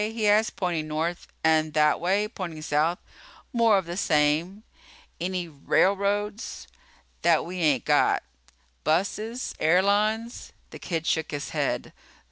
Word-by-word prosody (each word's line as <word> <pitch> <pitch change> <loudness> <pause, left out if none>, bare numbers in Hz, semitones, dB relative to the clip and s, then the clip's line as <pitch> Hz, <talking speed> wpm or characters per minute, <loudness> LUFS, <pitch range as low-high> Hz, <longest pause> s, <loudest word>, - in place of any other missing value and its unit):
he 225 -1 -1
asked, 215 +2 +3
pointing 170 -4 -2
north. 160 +3 -3 0.2
"And 155 -1 +2
that 150 -1 +3
way?" 195 +4 +1
pointing 170 -8 -7
south. 155 +4 +1 0.6
"More 230 -3 +4
of 190 - -1
the 170 +1 -5
same." 165 +4 +1 0.6
"Any 180 0 -2
railroads?" 200 +7 0 0.5
"That 170 -2 +3
we 180 +2 -6
ain't 145 -7 +2
got." - - +3 0.6
"Buses? 210 +9 -1
Airlines?" 205 +7 +1 0.2
The - - -9
kid 165 -2 -3
shook 160 -1 0
his 145 -1 -4
head. - - -2
175 Hz, 125 wpm, -26 LUFS, 155-205 Hz, 0.6 s, More